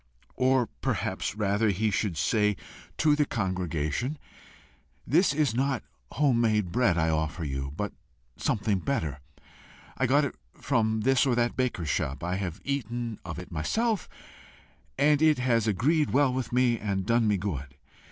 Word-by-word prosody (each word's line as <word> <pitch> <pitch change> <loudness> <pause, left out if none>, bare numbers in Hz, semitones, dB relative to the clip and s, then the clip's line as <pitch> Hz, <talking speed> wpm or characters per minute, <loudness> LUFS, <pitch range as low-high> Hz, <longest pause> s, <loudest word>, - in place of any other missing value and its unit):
Or 130 -1 +3
perhaps - - -3
rather, 105 +1 +1
he 105 +3 +1
should 95 -3 -1
say 105 +7 +2 0.4
to 150 -1 +4
the 150 - +3
congregation 95 - -2 0.9
'This 170 +7 +3
is 145 -4 +1
not 135 +1 0 0.3
home 130 -3 +2
made 105 -6 +1
bread 115 -7 +2
I 80 -1 +2
offer 80 +2 -1
you, 70 -2 -3
but 105 0 -3 0.4
something 105 -2 0
better. 80 - -2 0.8
I 130 - +1
got 145 +3 +4
it 140 - -4 0.2
from 110 -4 0
this 135 +3 +3
or 125 - +2
that 120 0 +1
baker's 120 - -1
shop. 65 +2 -2
I 90 +2 -1
have 90 -4 -4
eaten 120 -4 -3
of 85 -2 -6
it 90 - -8
myself, 215 - -1 0.9
and 145 +2 +4
it 155 -1 +5
has 120 -3 +1
agreed 145 - +2
well 135 -1 +3
with 130 -2 -3
me 120 -2 +2
and 100 -2 -2
done 115 0 +2
me 105 -1 +2
good. 70 -9 -4
110 Hz, 155 wpm, -28 LUFS, 90-130 Hz, 0.9 s, it